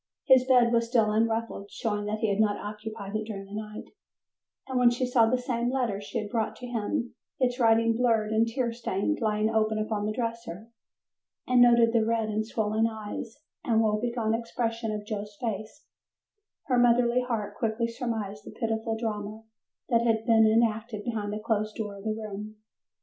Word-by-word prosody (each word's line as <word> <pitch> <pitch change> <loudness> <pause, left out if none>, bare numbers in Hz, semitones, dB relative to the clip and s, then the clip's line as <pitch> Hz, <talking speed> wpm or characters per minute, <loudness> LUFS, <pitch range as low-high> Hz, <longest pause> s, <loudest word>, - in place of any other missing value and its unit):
His 260 -2 +6
bed 245 -2 +5
was 230 0 +2
still 225 -3 +3
unruffled, 225 -2 -1
showing 210 -2 -2
that 215 +1 -3
he 220 - +2
had 200 +1 0
not 210 -1 +3
occupied 210 -1 -7
it 215 0 -1
during 200 -3 -6
the 195 - -13
night, 210 0 -6 0.8
and 260 -1 -1
when 245 -1 +6
she 245 +2 -1
saw 245 -2 +4
the 255 +3 +2
same 245 -1 -1
letter 240 -6 -1
she 205 - -5
had 210 -2 -4
brought 225 -2 -1
to 250 - -9
him, 240 +1 -2 0.3
its 250 -1 +1
writing 230 -1 +4
blurred 225 -3 +2
and 220 +1 +3
tear 235 0 -1
stained, 230 +4 -1
lying 215 -1 +1
open 220 -1 +1
upon 215 -1 -1
the - - 0
dresser, 230 -3 -5 0.7
and 250 -1 +4
noted 235 -1 +6
the 230 -2 +4
red 225 -1 0
and 215 +1 -1
swollen 220 0 +1
eyes 220 +4 -7 0.2
and 225 -2 +2
woe 215 -1 +1
begone 235 -2 0
expression 230 -1 -2
of 210 -1 -4
Joe's 210 -1 -5
face, 220 +4 -5 0.8
her 250 -4 +1
motherly 245 0 +4
heart 230 -5 -3
quickly 230 0 -1
surmised 225 -4 -4
the - - -10
pitiful 225 -1 -1
drama 215 -1 -4 0.5
that 230 -2 +4
had 225 -1 +1
been 225 -2 +5
enacted 220 -1 +1
behind 215 -3 -3
the 210 - -3
closed 215 -1 -1
door 210 -3 -5
of 200 - -12
the 215 0 0
room. 215 0 -7
225 Hz, 185 wpm, -28 LUFS, 215-235 Hz, 0.8 s, His